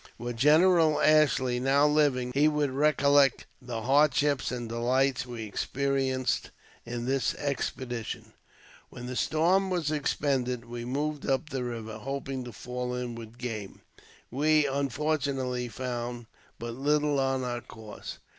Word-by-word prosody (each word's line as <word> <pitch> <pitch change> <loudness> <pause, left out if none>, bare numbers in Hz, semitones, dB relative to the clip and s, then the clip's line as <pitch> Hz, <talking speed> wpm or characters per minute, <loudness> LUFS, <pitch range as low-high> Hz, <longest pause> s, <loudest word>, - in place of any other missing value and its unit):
Were 120 +1 -4
General 155 +5 +4
Ashley 140 -5 +3
now 135 +3 +3
living, 145 -4 +2
he 145 +3 +4
would 150 -2 +1
recollect 140 0 +3 0.2
the 120 -3 -5
hardships 145 +1 +3
and 120 -2 -4
delights 130 +3 +1
we 120 -2 -6
experienced 130 +3 -1 0.4
in 120 0 -4
this 135 +1 0
expedition. 130 -4 -4 0.6
When 125 - -9
the 125 +1 -5
storm 180 +8 +2
was 170 -5 -1
expended 135 -5 -1
we 120 0 -6
moved 145 +3 -2
up 135 +3 0
the 130 -2 -2
river, 115 -2 -5
hoping 135 +1 -4
to 120 - -7
fall 125 +3 -4
in 125 -1 -4
with 115 0 -10
game. 110 -5 -6 0.5
We, 150 +3 +3
unfortunately, 140 -2 -1
found 120 -1 -4 0.3
but 115 0 -5
little 145 +2 +1
on 135 -1 0
our 120 -1 -3
course. 110 -2 -9
130 Hz, 135 wpm, -28 LUFS, 120-145 Hz, 0.6 s, General